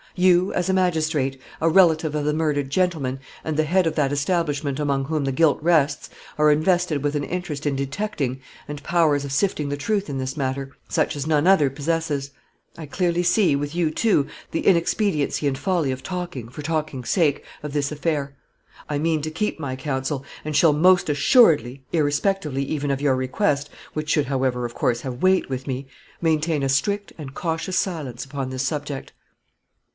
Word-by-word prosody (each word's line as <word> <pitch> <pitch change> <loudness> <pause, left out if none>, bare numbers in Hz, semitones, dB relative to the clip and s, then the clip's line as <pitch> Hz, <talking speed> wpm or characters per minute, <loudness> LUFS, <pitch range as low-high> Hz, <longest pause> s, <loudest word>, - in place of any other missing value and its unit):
You, 185 +1 +4
as 180 -1 0
a 190 - +2
magistrate, 155 -7 +1 0.2
a 165 - +3
relative 160 -3 +4
of 150 -1 -1
the 150 - +1
murdered 150 -3 0
gentleman, 145 -6 0 0.3
and 155 - -2
the 155 - +2
head 180 +4 +2
of 160 - -1
that 145 -3 +1
establishment 145 -2 0
among 140 -2 0
whom 155 0 -1
the 135 - 0
guilt 155 +2 +3
rests, 155 -3 +2 0.3
are 150 0 +6
invested 160 0 +2
with 145 0 0
an 145 - 0
interest 160 -3 -4
in 140 - 0
detecting, 140 - -3 0.3
and 150 0 -7
powers 155 -4 +2
of 140 - -5
sifting 150 -1 0
the 145 - -2
truth 200 +7 -1
in 140 - -3
this 130 +1 -3
matter, 135 -1 -3 0.2
such - - 0
as 145 +1 -4
none 155 +1 +2
other 160 -8 +5
possesses. 145 -1 -2 0.5
I 160 -2 -7
clearly 175 +2 0
see, 175 -3 +3
with 145 +1 -3
you, 170 -2 +2
too, 195 -5 +2 0.2
the 165 - -3
inexpediency 170 -4 +2
and 135 -1 -1
folly 175 -7 0
of 130 0 -5
talking, 175 -10 -5
for 145 +4 -8
talking's 155 -5 -3
sake, 160 -7 +2 0.2
of 150 - -4
this 145 0 -1
affair. 150 -2 -2 0.5
I 145 - -1
mean 160 +1 +1
to 155 +2 -4
keep 165 +3 -2
my 135 -4 -3
counsel, 135 0 -3 0.2
and 155 0 -4
shall 160 -3 +5
most 180 +3 +4
assuredly, 145 - +4
irrespectively 150 -1 0
even 145 0 -2
of 135 0 -2
your 140 -3 +3
request 140 +2 0 0.2
which 155 0 -4
should, 150 -2 +2
however, 130 -2 0
of 120 - -5
course, 120 0 0
have 125 -1 -6
weight 185 0 +3
with 130 0 -5
me 130 0 -4 0.3
maintain 160 -2 +1
a 135 - 0
strict 200 +10 0
and 135 -3 -7
cautious 170 +2 -2
silence 150 - -2
upon 135 -1 -4
this 130 0 -3
subject." 145 0 -4
150 Hz, 185 wpm, -23 LUFS, 140-170 Hz, 0.5 s, are